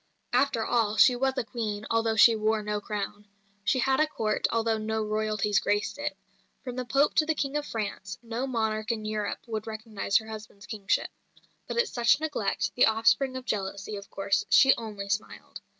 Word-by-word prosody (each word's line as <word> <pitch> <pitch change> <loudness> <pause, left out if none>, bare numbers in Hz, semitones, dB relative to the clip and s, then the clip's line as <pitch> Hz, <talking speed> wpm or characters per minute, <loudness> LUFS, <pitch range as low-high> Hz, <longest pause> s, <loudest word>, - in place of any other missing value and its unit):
After 235 -5 +2
all, 220 -3 +1
she 220 +5 +7
was 265 +2 0
a - - +1
Queen, 215 -3 -4
although 225 -1 +2
she 225 +1 +7
wore 215 0 0
no 210 0 -2
crown. 205 0 -5 0.4
She 260 - +2
had 265 +1 +2
a 310 - +4
Court, 215 -7 0
although 225 -1 +1
no 220 0 -1
Royalties 215 -1 0
graced 205 +6 -1
it. 290 0 -3 0.5
From 250 -3 -6
the 255 0 -3
Pope 275 +5 +2
to 310 - +5
the 320 - +1
King 275 -1 -2
of 295 0 -1
France, 200 -3 -4
no 235 +3 -3
monarch 220 -3 -1
in 215 -2 -4
Europe 215 -1 -3
would 220 -2 -5
recognise 220 -2 -1
her 220 - -4
husband's 215 -2 -9
kingship. 205 -3 -1 0.6
But - - -4
at 475 0 +3
such 240 +3 +3
neglect, 285 -11 -1
the 250 - +5
offspring 230 +4 +2
of 255 - -8
jealousy, 200 0 -3
of 200 0 -9
course, 195 0 0
she 270 0 +7
only 210 -3 -6
smiled. 205 +1 -4
220 Hz, 190 wpm, -28 LUFS, 210-245 Hz, 0.6 s, she